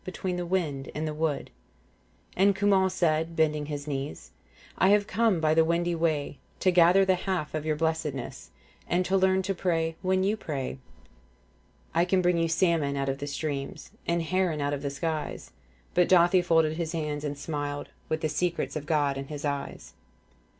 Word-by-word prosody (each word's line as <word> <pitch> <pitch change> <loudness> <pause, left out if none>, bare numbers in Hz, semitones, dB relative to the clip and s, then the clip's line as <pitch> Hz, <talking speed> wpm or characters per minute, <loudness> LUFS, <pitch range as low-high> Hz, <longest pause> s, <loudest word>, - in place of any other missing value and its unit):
Between 185 0 -4
the 175 -1 -3
wind 155 -7 -1
and 155 +1 -2
the 155 - -3
wood. 155 -1 -2 0.8
And 195 +1 +4
Cumhal 195 -2 +3
said, 165 -2 0
bending 150 -2 +1
his 145 -1 -5
knees, 135 - -5 0.2
' - - -24
I 190 - +5
have 205 0 +4
come 220 -4 +2
by 155 -1 +3
the 160 0 +5
windy 170 +1 +1
way 155 -4 -1
* - - -35
To 185 - +4
gather 180 +2 +6
the 190 - +4
half 185 -4 -2
of 155 0 -3
your 155 - +1
blessedness 155 -4 -3 0.2
' - - -30
And 180 +1 +1
learn 190 0 +3
to 195 +1 -1
pray 165 -3 0
when 185 0 +1
you 205 +3 +2
pray, 135 -7 -4 0.6
' - - -35
I 170 +1 +3
can 185 0 +2
bring 175 -1 +3
you 165 - +2
salmon 165 -4 +1
out 135 0 -1
of 135 0 -2
the 145 - -4
streams 140 -1 -4
' - - -28
And 170 0 +1
heron 180 -2 0
out 145 0 0
of 140 - -3
the 140 - -2
skies. 155 +2 -4 0.2
' - - -34
But 180 -1 +3
Dathi 180 0 +5
folded 160 -2 +2
his 170 -1 -3
hands 150 -2 -3
and 145 -1 -3
smiled 145 -1 -4 0.2
With 155 0 -1
the 155 - +1
secrets 175 +2 -1
of 150 -1 -5
God 145 -3 +1
in 135 - -6
his 150 0 -6
eyes. 140 - -4
160 Hz, 200 wpm, -28 LUFS, 145-180 Hz, 0.8 s, gather